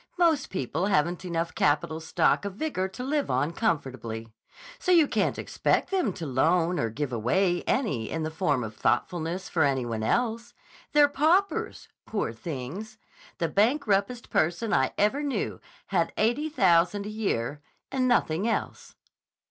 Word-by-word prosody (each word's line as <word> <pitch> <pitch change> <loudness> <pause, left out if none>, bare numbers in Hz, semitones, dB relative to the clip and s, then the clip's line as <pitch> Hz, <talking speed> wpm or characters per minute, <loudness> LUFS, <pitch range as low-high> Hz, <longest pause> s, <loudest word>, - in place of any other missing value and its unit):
Most 330 -4 +2
people 165 +2 -2
haven't 175 -2 +1
enough 170 -1 -2
capital 150 +2 +1
stock 160 +3 +1
of 200 -2 -5
vigor 205 -8 -2
to 190 +6 -8
live 285 +2 -1
on 155 +4 0
comfortably. 130 - -2 0.5
So 365 - 0
you 330 -4 +6
can't - - 0
expect - - 0
them 370 - +1
to 165 - -6
loan 165 +6 +2
or 115 - 0
give 130 +3 -4
away 175 - +1
any 140 - 0
in 160 - -3
the 155 - -3
form 150 -6 0
of 105 -1 -7
thoughtfulness 175 - -1
for 165 - -1
any 135 -4 +2
one 115 -2 -3
else. 235 - -1 0.4
They're 295 -1 +7
paupers, 325 +8 +1 0.2
poor 205 - -2
things! 160 - -6 0.4
The 170 - 0
bankruptest 215 - +1
person 175 +7 +1
I 130 - +2
ever 215 +8 +2
knew 275 -7 -2 0.3
had 170 -4 +1
eighty 240 +8 +1
thousand 190 - +3
a - - -4
year, 150 - -2 0.3
and 260 -2 +1
nothing 200 -5 +2
else." - - -3
180 Hz, 155 wpm, -27 LUFS, 150-235 Hz, 0.5 s, They're